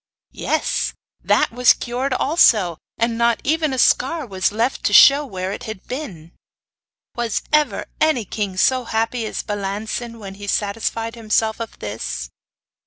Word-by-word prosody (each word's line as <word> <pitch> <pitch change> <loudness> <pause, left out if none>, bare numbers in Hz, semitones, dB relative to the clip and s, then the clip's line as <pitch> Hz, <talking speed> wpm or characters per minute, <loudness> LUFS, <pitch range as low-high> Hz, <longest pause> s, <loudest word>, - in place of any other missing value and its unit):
Yes, - - -1 0.3
that - - +2
was 245 +1 +5
cured 255 +3 -3
also; 215 - +3 0.2
and 230 0 0
not 235 0 +2
even 310 0 +1
a 260 - -3
scar 280 +5 +2
was 190 -4 -1
left 230 +5 -1
to 205 - +1
show 280 +6 +8
where 190 -8 -5
it 245 - -6
had 220 -4 -8
been! 190 - -7 0.8
Was 235 -2 -2
ever 300 -1 +2
any 310 -8 +2
king 195 -2 -4
so 255 +5 +2
happy 225 +1 -1
as - - -4
Balancin 210 +3 -4
when 200 -3 -8
he 205 - -7
satisfied 225 +3 -2
himself 220 -1 0
of 230 -1 -7
this? 65 - -5
225 Hz, 150 wpm, -20 LUFS, 200-250 Hz, 0.8 s, show